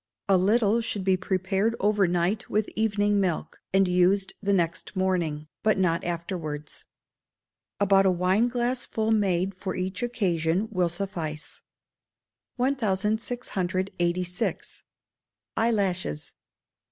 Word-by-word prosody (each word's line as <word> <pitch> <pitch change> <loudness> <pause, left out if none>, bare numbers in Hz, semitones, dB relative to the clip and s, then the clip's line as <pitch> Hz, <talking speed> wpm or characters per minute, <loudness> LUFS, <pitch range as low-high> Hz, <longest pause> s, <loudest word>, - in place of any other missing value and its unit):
A 195 - +5
little 210 +4 +3
should 205 -3 -2
be 190 0 +3
prepared 190 +4 0
over 205 -1 +3
night 180 +6 0
with 215 0 +1
evening 205 -1 +2
milk, 175 -5 -1
and 195 0 +4
used 180 +2 +2
the 200 0 0
next 170 0 0
morning, 170 -5 0
but 215 -2 +2
not 170 -3 +1
afterwards. 165 -4 -5 0.9
About 195 -1 +4
a - - +5
wine 185 +6 +2
glassful 240 -2 -1
made 195 -3 +1
for 185 0 -5
each 185 0 -3
occasion 190 -5 0
will 180 -4 +1
suffice. 170 -4 -5 0.9
1686. 195 -7 -1 0.7
Eyelashes. 195 - 0
190 Hz, 105 wpm, -26 LUFS, 180-210 Hz, 0.9 s, A